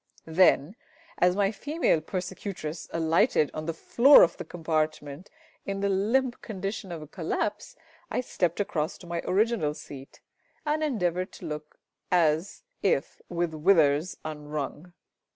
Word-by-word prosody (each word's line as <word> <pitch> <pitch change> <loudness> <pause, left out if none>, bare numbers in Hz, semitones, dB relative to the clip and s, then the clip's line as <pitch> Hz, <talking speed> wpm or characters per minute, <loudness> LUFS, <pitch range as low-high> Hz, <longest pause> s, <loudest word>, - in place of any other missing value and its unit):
Then, 165 0 +3 0.4
as 180 0 +4
my 200 0 +2
female 285 - 0
persecutress 180 -2 -5
alighted 165 - +2
on 155 +1 -5
the 165 - -1
floor 265 - +7
of 170 - +2
the - - -5
compartment 155 -1 -3 0.3
in 195 0 -4
the 200 - +1
limp 235 +7 +1
condition 195 -2 -5
of 165 -3 -6
a - - -11
collapse, 185 +6 -3 0.3
I - - -1
stepped 175 -8 -1
across 160 -5 -1
to - - -14
my 170 0 -3
original 200 -7 +1
seat, 135 -2 -11 0.5
and 305 +1 0
endeavoured 185 - -1
to 180 - -10
look 150 -1 -7 0.3
as 165 - +2 0.2
if - - 0
with 170 -2 -1
withers 155 -1 +3
unwrung. 150 +2 -5
175 Hz, 135 wpm, -27 LUFS, 155-200 Hz, 0.5 s, floor